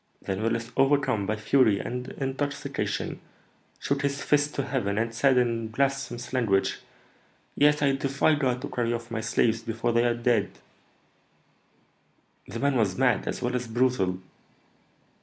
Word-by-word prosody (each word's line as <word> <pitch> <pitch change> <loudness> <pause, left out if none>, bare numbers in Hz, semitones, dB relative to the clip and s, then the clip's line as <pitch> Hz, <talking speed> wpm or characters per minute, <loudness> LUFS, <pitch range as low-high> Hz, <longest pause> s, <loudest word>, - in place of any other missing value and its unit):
Then 95 +1 -3
Willis, 115 +1 -1
overcome 135 -6 +2
by 110 - 0
fury 110 -1 +3
and 125 +1 -4
intoxication, 140 +1 -3 0.6
shook 140 0 -1
his 140 0 -1
fist 145 0 +1
to 140 - -1
heaven, 125 -7 -2
and 115 +1 -1
said, 130 +2 +3
in 115 -2 +1
blasphemous 135 0 -2
language, 105 -7 +1 0.8
'Yes, 150 0 +4
I 140 - +4
defy 135 +3 +1
God 130 -4 0
to - - -2
carry 120 -1 -1
off 115 0 -5
my 110 -1 -2
slaves 115 0 +1
before 115 +1 -2
they 115 +1 +3
are 120 -1 +2
dead!'" 120 -4 0 1.9
"The - - -6
man 140 +2 +1
was 100 -5 +1
mad 125 -3 +2
as - - -3
well 125 +1 -1
as 125 -1 -2
brutal." 115 -6 +1
125 Hz, 150 wpm, -27 LUFS, 115-135 Hz, 1.9 s, Yes